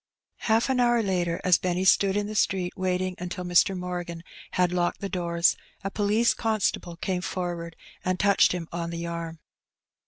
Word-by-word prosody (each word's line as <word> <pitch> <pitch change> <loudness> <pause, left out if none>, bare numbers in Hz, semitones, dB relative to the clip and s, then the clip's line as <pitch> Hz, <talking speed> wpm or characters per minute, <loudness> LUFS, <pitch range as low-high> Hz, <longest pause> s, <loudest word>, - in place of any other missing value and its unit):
Half 225 +1 +3
an 255 - +1
hour 240 -1 +3
later, 175 -4 0
as 180 -2 +4
Benny 180 +1 -1
stood 195 +1 +4
in 205 - 0
the 215 - -5
street 190 -4 0
wsating 185 -1 -1
until 180 +1 -4
Mr. 180 +2 +3
Morgan 175 -2 -5 0.3
had 180 -1 +2
locked 175 -1 0
the 200 - -4
doors, 170 -2 +2 0.3
a 195 - -3
police 215 +3 +2
constable 210 -6 -1
came 180 +1 -2
forward 175 -2 -4 0.3
and 185 -1 -1
touched 200 +1 +4
him 175 -2 -3
on 170 0 -3
the 170 0 -4
arm. 170 -1 -5
180 Hz, 175 wpm, -26 LUFS, 175-195 Hz, 0.3 s, as